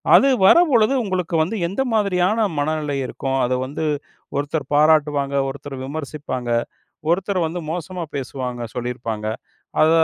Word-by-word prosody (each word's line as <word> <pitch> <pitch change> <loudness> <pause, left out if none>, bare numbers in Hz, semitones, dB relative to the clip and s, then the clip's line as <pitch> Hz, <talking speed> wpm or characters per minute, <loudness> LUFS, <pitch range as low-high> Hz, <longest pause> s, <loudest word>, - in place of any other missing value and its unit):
அது 275 - +7 0.2
வரும் 340 - +7
பொழுது 230 +1 +4
உங்களுக்கு 185 -4 -2
வந்து 185 +8 -3
எந்த 195 +9 -2
மாதிரியான 205 +1 +2
மனநிலை 150 -1 -1
இருக்கும்? 135 +1 -2
அத 125 - 0
வந்து 145 +4 -4 0.5
ஒருத்தர் 145 -1 -2
பாராட்டுவாங்க, 150 -2 +3
ஒருத்தர் 140 0 -7
விமர்சிப்பாங்க. 140 -4 -5 0.6
ஒருத்தர் 185 0 +1
வந்து 170 +1 -4
மோசமா 175 +1 -4
பேசுவாங்க 125 -2 -4
சொல்லியிருப்பாங்க. 120 -3 -3 0.6
அத 155 - +6
155 Hz, 125 wpm, -21 LUFS, 135-180 Hz, 0.6 s, அது